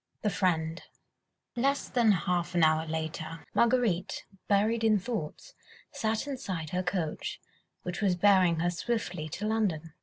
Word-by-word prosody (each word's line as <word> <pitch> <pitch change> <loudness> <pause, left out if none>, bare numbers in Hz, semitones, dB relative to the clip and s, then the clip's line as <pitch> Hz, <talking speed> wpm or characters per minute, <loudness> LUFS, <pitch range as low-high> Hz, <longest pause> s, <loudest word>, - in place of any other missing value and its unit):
THE 210 - +2
FRIEND 165 -3 0 0.7
Less 275 +3 +1
than 235 -4 +3
half 180 -1 0
an 170 - +4
hour 155 0 +3
later, 160 0 -4
Marguerite, 235 -7 +1 0.2
buried 215 +3 +2
in 220 -1 +5
thoughts, 215 - -5 0.4
sat 220 +1 -1
inside 185 - -4
her 180 - 0
coach, 180 -4 -3 0.4
which 180 +2 -4
was 190 -3 +3
bearing 180 -3 +4
her 175 +1 +1
swiftly 180 -5 -3
to 195 +7 -4
London. 185 -8 -1
185 Hz, 140 wpm, -29 LUFS, 165-220 Hz, 0.7 s, in